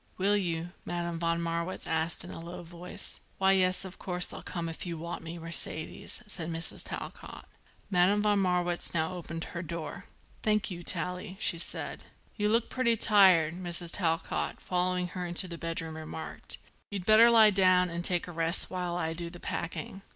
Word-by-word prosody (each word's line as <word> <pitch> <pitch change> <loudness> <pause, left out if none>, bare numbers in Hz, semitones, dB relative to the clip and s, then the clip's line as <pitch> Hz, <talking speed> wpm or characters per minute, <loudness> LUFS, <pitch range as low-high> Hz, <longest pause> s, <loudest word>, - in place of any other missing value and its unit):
"Will 200 +2 +3
you?" 175 -3 -1
Madame 170 -1 -3
von 170 0 +1
Marwitz 170 +2 -2
asked 160 0 +2
in 175 - -8
a - - -7
low 170 +1 -7
voice. 175 +1 -7 0.2
"Why, 190 0 +4
yes, 185 -1 +2
of 190 -1 -9
course 180 -1 -1
I'll - - -6
come 170 -2 -4
if 165 - -5
you 170 -2 -4
want 170 +2 -5
me, 165 +1 -7
Mercedes," 165 +5 -2
said 175 -6 -5
Mrs. 165 0 -1
Talcott. - - -7 0.5
Madame 195 +3 +4
von 205 -1 +3
Marwitz 180 -2 0
now 160 +2 +1
opened 165 -2 -5
her 170 - -5
door. 165 -3 -6 0.4
"Thank 215 -2 +1
you, 175 -1 -5
Tallie," 180 +2 -2
she 170 - +1
said. - - -2 0.3
"You 210 -1 +1
look 230 +2 +3
pretty 235 -3 +2
tired," 185 -8 +6
Mrs. 175 -1 -2
Talcott, 165 -4 -1
following 180 0 0
her 180 -1 -4
into 175 +2 +2
the 170 -2 -7
bedroom, 165 -1 -3
remarked. 160 0 -6 0.3
"You'd 195 -3 -4
better 220 +3 +8
lie 220 -2 +8
down 185 -2 +4
and 170 +1 -3
take 175 -1 +1
a - - -6
rest 165 +1 +1
while 180 -2 -2
I 165 -2 -1
do 170 +1 -3
the 175 0 -11
packing. 190 +3 -4
175 Hz, 180 wpm, -30 LUFS, 165-185 Hz, 0.5 s, better